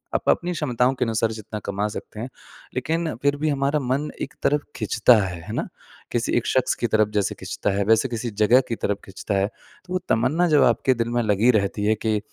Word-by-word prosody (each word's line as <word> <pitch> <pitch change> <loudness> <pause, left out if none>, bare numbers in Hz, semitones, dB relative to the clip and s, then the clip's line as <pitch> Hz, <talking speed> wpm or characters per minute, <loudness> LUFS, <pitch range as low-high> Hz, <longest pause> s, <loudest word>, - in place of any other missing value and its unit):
आप - - 0
अपनी 175 +1 +2
क्षमताओं 125 -5 +1
के 130 -1 -1
अनुसार 115 0 0
जितना 110 -1 -6
कमा 100 +1 -1
सकते 105 0 -8
हैं, 120 +4 -5 0.5
लेकिन 160 +5 -1
फिर 145 0 +2
भी 155 +1 0
हमारा 140 +1 +1
मन 135 +3 -1
एक 140 - -4
तरफ 145 +1 +2
खींचता 115 +2 +4
है, 90 -3 -5
है - - -5
ना? - - -2 0.4
किसी 120 -1 -1
एक 120 - -1
शख्स 130 - +2
की 120 - -1
तरफ 110 0 +3
जैसे 105 -2 0
खींचता 105 - -3
है, 100 - +2
वैसे 115 +4 +3
किसी 120 0 -3
जगह 125 +5 +6
की 115 - -1
तरफ 100 -2 -2
खींचता 100 +1 -4
है, 95 - +2
तो 180 - -14
वो 185 - +1
तमन्ना 135 +10 +2
जब 150 - +5
आपके 120 +2 +3
दिल 115 -1 -2
में 120 0 +1
लगी 110 +3 +3
रहती 100 +1 -2
है 110 +1 +3
कि 110 -1 +2
120 Hz, 225 wpm, -23 LUFS, 105-140 Hz, 0.5 s, जगह